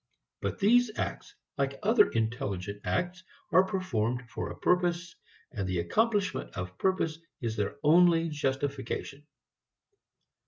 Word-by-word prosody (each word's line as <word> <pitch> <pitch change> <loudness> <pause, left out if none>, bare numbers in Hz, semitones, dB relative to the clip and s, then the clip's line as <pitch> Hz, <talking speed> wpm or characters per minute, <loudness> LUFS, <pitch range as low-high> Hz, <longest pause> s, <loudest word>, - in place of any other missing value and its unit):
But - - -2
these 240 +3 +4
acts 415 - -4 0.2
like 135 0 0
other 215 0 +5
intelligent 105 -3 -2
acts 175 - -1 0.3
are 185 +3 +6
performed 125 - -1
for - - -4
a - - -8
purpose, 180 0 +1 0.4
and 100 -7 -3
the 90 - -1
accomplishment 205 - 0
of 95 0 -6
purpose 165 -4 0 0.2
is 115 -2 -2
their 105 -2 -2
only 165 +1 +5
justification. 140 0 -3
150 Hz, 120 wpm, -29 LUFS, 115-185 Hz, 0.4 s, are